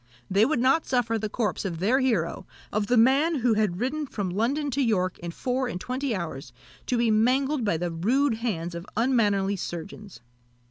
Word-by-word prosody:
They 200 +3 +5
would 310 - +1
not 265 +6 +2
suffer 235 -3 +1
the 215 0 -3
corpse 210 -3 -2
of 180 -5 -3
their 220 +10 +2
hero 220 - 0 0.2
of 210 0 -1
the 245 - +3
man 275 +8 +4
who 245 -4 +2
had 210 -5 0
ridden 285 +5 -2
from 200 -7 -3
London 275 +9 0
to 275 +3 0
York 185 -7 0
in 170 - -6
four 255 +8 -2
and 180 - -4
twenty 255 +2 -2
hours 160 -7 -5 0.4
to 250 - +1
be 235 -1 +2
mangled 255 +5 +2
by 205 -6 +1
the 175 +1 -2
rude 230 +9 +1
hands 175 -8 -3
of 170 +3 -7
unmannerly 205 -5 +2
surgeons. 180 - -7
225 Hz, 190 wpm, -26 LUFS, 190-260 Hz, 0.4 s, They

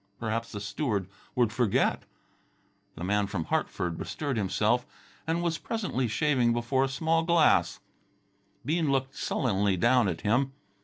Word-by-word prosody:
Perhaps 115 0 -2
the 105 - -5
steward 105 -2 -2 0.3
would 120 -4 +2
forget. 115 -4 +1 0.9
The 85 - -7
man 100 +2 +1
from 95 -4 -3
Hartford 85 +1 -2
bestirred 145 -4 -3
himself 110 +4 +1 0.4
and 165 +1 0
was 165 -2 -1
presently 195 - -2
shaving 125 0 +2
before 130 +3 +1
the - - -7
small 160 +4 +1
glass. 165 -2 +3 0.8
Bean 155 0 +1
looked 135 0 -1
sullenly 100 -5 0
down 120 +3 +4
at 85 -3 -3
him. 130 +6 +1
120 Hz, 140 wpm, -28 LUFS, 105-145 Hz, 0.9 s, down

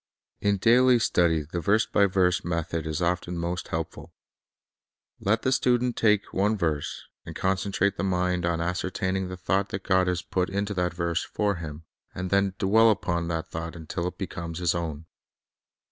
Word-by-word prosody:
In 100 0 +1
daily 125 +4 +5
study 85 -8 +2
the 85 +4 -4
verse 105 +7 +3
by 100 - +3
verse 90 -1 +2
method 85 -1 -2
is 80 +2 -2
often 90 0 -1
most 85 +1 -3
helpful. 80 0 -5 1.0
Let 110 +3 +1
the 130 - +2
student 125 -1 +2
take 105 -2 +2
one 105 +3 +2
verse, 80 -6 -2 0.2
and - - -9
con 95 0 +1
centrate 100 +1 0
the - - -2
mind 90 -1 0
on 85 -1 0
ascertaining 95 +2 -1
the 90 - -6
thought 95 +2 0
that 95 0 -5
God 95 -1 +3
Thoroughness 90 -1 0
has - - -28
put 90 -1 0
into 100 +1 -2
that 90 -2 -1
verse 85 -1 0
for 100 -3 -1
him, 80 -1 -7 0.3
and 95 0 -4
then 100 -1 +2
dwell 110 +4 +5
upon 85 -5 0
concentration 85 -1 0
the 80 - -4 0.2
thought 85 +1 -6
until 85 +2 -4
it 90 - -6
becomes 85 -4 -5
his 90 -2 +1
own. 80 -3 -4
90 Hz, 185 wpm, -26 LUFS, 85-100 Hz, 1.0 s, daily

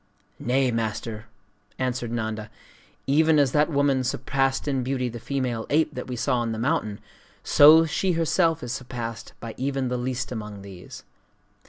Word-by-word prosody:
'Nay, 130 +1 +1
Master!' 115 -1 -3 0.5
answered 125 -2 -2
Nanda; 110 -2 -3 0.6
'even 155 +3 +4
as 140 -3 +3
that 150 +2 +3
woman 140 -3 +2
surpassed 135 +2 0
in 135 -2 0
beauty 125 0 -1
the 120 0 -7
female 125 -3 -2
ape 155 +1 +2
that 125 - -6
we 125 - -4
saw 125 +1 0
on 115 -1 -1
the - - -4
mountain, 115 -5 -1 0.4
so 155 +3 +8
is 160 - -4
she 185 +2 +1
herself 165 -3 +1
surpassed 120 -2 -5
by 115 -1 -7
even 135 -1 -1
the 125 - -1
least 125 +1 -3
among 105 -4 -6
these. 95 -3 -11
125 Hz, 160 wpm, -25 LUFS, 115-140 Hz, 0.6 s, so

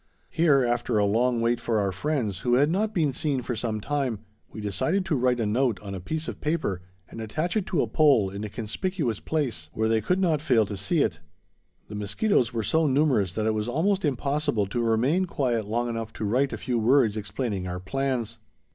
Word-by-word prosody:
Here, 150 -5 +4
after 120 -1 0
a 105 - +3
long 115 +3 +2
wait 115 +1 +1
for 115 -2 0
our 100 -2 +1
friends, 110 - -2
who 120 +3 +2
had 145 +4 +3
not 210 +4 0
been 155 -8 +1
seen 135 -1 -1
for 125 - -3
some 110 -1 -2
time, 135 -1 -1 0.3
we - - -9
decided 110 - -1
to 170 - 0
write 125 -1 +1
a 115 - +1
note 115 -1 +1
on 100 -2 -7
a 95 - -4
piece 155 - -4
of - - -6
paper 150 - -1 0.3
and 115 - -8
attach 155 - -2
it 210 -4 0
to 165 - +1
a - - -2
pole 115 -6 +3
in 100 +2 -6
a 105 - -4
conspicuous 120 - -3
place 125 - -2
where 110 0 0
they 110 0 +2
could 180 - +1
not 165 -6 +2
fail 125 -8 +3
to 100 - -5
see 100 0 +1
it. - - -2 0.7
The - - -9
mosquitoes 115 - +1
were 115 -2 -2
so 160 +7 +2
numerous 130 - +2
that 110 +1 -1
it 110 - +2
was 105 +1 -2
almost 185 +10 +1
impossible 140 -4 0
to 110 +5 -2
remain 125 +11 +2
quiet 125 - -1
long 120 +3 -1
enough 115 -2 -4
to 110 - -4
write 130 +6 +1
a - - -4
few 125 -3 -1
words 115 -1 +3
explaining 105 -2 -3
our 90 0 -4
plans. 130 +3 -2
120 Hz, 220 wpm, -26 LUFS, 105-145 Hz, 0.7 s, Here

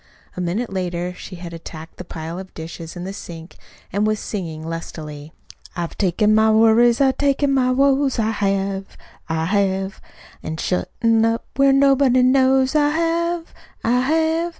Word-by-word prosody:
A 180 - -4
minute 195 +6 -2
later 180 -1 -2
she 180 +1 -10
had 170 -1 -8
attacked 165 -1 -10
the - - -7
pile 165 0 -6
of 190 0 -11
dishes 165 +1 -8
in 175 - -6
the 190 +2 -5
sink, 165 -3 -10 0.4
and 205 +2 +1
was 215 -1 0
singing 165 -6 -5
lustily: 155 -2 -7 0.4
"I've 170 -2 -4
taken 210 +3 +2
my 220 0 +4
worries, 225 +2 +5
an' 270 -1 +4
taken 280 0 +2
my 255 -2 +2
woes, 275 +1 +2
I 220 -1 +1
have, 195 -2 -2 0.3
I 160 0 0
have, 195 0 0 0.4
An' 160 0 -5
shut 180 +2 -1
'em 225 -1 +4
up 230 0 0
where 275 0 +4
nobody 270 -2 +4
knows, 260 0 +3
I 295 -1 +3
have, 335 +2 -1 0.3
I 245 +2 +2
have. 320 +5 +1
215 Hz, 165 wpm, -21 LUFS, 175-265 Hz, 0.4 s, worries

